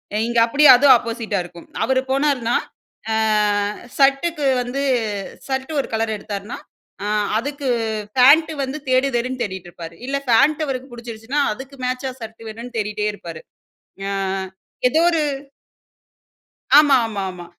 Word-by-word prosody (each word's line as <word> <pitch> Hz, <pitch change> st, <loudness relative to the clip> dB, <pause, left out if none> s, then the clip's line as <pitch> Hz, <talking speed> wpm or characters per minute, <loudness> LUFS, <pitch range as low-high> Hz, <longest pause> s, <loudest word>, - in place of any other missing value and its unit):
அ -, -, +1 dB
இங்கே 235 Hz, -1 st, +2 dB
அப்டியே 290 Hz, +5 st, +7 dB
அதும் 270 Hz, +1 st, +7 dB
ஆப்போசிட்டா 230 Hz, -3 st, -3 dB
இருக்கும் 175 Hz, -1 st, -14 dB, 0.2 s
அவரு 260 Hz, 0 st, +2 dB
போனாருனா, 270 Hz, -4 st, +1 dB, 0.6 s
ஆ -, -, +1 dB, 0.8 s
ஷர்டக்கு 280 Hz, +3 st, +2 dB, 0.2 s
வந்து 250 Hz, +3 st, -3 dB, 0.7 s
ஷர்ட்டு 265 Hz, +3 st, -3 dB
ஒரு -, -, -9 dB
கலர் 220 Hz, -1 st, -1 dB
எடுத்தாருனா 205 Hz, +1 st, -6 dB, 0.5 s
அ -, -, -2 dB, 0.3 s
அதுக்கு 280 Hz, +3 st, -4 dB, 0.5 s
ஃபேண்ட் 285 Hz, +6 st, +6 dB
வந்து 265 Hz, +2 st, -4 dB
தேடு 255 Hz, +1 st, +3 dB
தேடுன்னு 250 Hz, +1 st, -2 dB
தேடிட்ருப்பாரு 175 Hz, -4 st, -8 dB
இல்ல 275 Hz, -, -1 dB
ஃபேண்ட் 295 Hz, +6 st, +4 dB
அவருக்கு 265 Hz, -1 st, -4 dB
புடிச்சிருச்சுன்னா, 235 Hz, +3 st, -4 dB
அதுக்கு 265 Hz, +4 st, -11 dB
மேட்சா 255 Hz, +1 st, -2 dB
ஷர்ட் 225 Hz, 0 st, -9 dB
வேணுன்னு 230 Hz, +3 st, -9 dB
தேடிட்டே 210 Hz, 0 st, -2 dB
இருப்பாரு. 170 Hz, -5 st, -9 dB, 0.6 s
ஞா 200 Hz, -, -3 dB, 0.8 s
ஏதோ 315 Hz, -, +2 dB
ஒரு 325 Hz, -2 st, +1 dB, 1.6 s
ஆமாமாமா. 225 Hz, -, +3 dB
250 Hz, 125 wpm, -20 LUFS, 220-275 Hz, 1.6 s, அப்டியே